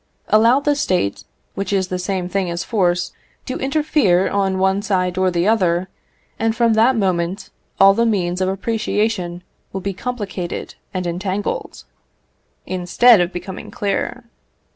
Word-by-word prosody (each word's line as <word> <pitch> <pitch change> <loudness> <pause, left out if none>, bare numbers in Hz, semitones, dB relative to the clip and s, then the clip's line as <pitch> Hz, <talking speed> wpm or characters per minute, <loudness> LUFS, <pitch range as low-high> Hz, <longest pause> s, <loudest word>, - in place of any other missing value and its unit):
Allow 230 +5 +5
the 290 0 +2
State, 105 - -1 0.3
which 195 +1 -3
is 190 -2 0
the 185 - -2
same 180 -1 -2
thing 185 0 -1
as 170 +1 -3
force, 180 -6 0 0.3
to 255 - -4
interfere 275 - +2
on 195 -1 +1
one 190 +1 +2
side 185 -3 0
or 185 0 +2
the 175 +1 0
other, 185 -4 +2 0.5
and 225 0 +1
from 235 -1 +3
that 230 +4 +4
moment 185 -1 -1 0.3
all 195 0 +8
the 230 - +1
means 180 -4 0
of 185 - +1
appreciation 200 -3 -1 0.3
will 190 - -4
be 195 +1 -3
complicated 195 -5 -5 0.2
and 185 -1 -3
entangled, 185 +3 -3 0.8
instead 185 +4 +4
of 175 0 0
becoming 190 +1 -7
clear. 200 -1 -2
190 Hz, 145 wpm, -20 LUFS, 180-220 Hz, 0.8 s, all